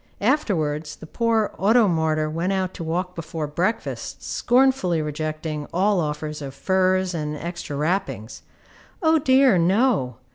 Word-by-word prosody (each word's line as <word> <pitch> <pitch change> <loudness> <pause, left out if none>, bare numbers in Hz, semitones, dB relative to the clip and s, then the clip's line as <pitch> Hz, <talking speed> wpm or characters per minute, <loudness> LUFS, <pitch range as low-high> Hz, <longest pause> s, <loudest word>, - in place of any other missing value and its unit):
Afterwards 165 - 0
the - - -12
poor 225 +4 0
auto 220 +3 +4
martyr 160 -3 +1
went 165 +5 -2
out 190 -1 -1
to 170 - -6
walk 180 +3 -2
before 165 -2 -5
breakfast, 175 +9 -3
scornfully 245 -9 +2
rejecting 155 0 -4
all 195 +2 +2
offers 150 -1 -3
of 135 -1 -7
furs 185 -1 +1
and 150 -2 -3
extra 170 -2 -6
wrappings. 155 - -2 0.6
O 320 0 +4
dear, 260 -7 +4
no! 185 - +2
175 Hz, 135 wpm, -23 LUFS, 155-205 Hz, 0.6 s, auto